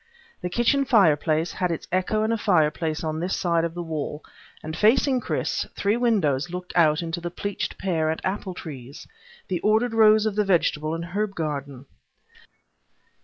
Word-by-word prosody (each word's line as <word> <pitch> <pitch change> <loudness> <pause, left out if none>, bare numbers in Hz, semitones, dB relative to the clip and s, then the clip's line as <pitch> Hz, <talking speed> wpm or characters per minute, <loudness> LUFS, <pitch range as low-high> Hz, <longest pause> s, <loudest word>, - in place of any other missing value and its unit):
The 180 - -3
kitchen 240 +8 +2
fireplace 165 - +3
had 180 - -1
its 165 - -4
echo 185 +4 +1
in 220 - 0
a - - +2
fireplace 160 -5 +1
on 155 0 -2
this 180 +3 -1
side 170 -2 +1
of 165 0 -3
the 175 - -4
wall, 155 -2 -4 0.4
and 155 0 -5
facing 255 - +3
Chris - - -2
three 205 +2 +1
windows 180 - +1
looked 180 +1 -7
out 160 -1 +4
onto 170 +1 -4
the 175 - -3
pleached 200 +3 -4
pear 165 -5 0
and 160 - -1
apple 190 -1 -3
trees; 140 -5 -9 0.4
the 180 -2 -1
ordered 220 +5 +2
rows 215 -1 +5
of 215 -2 -1
the 210 - +2
vegetable 160 -4 +1
and 165 0 -5
herb 200 +3 -3
garden. 140 -4 -4
175 Hz, 170 wpm, -24 LUFS, 155-210 Hz, 0.4 s, rows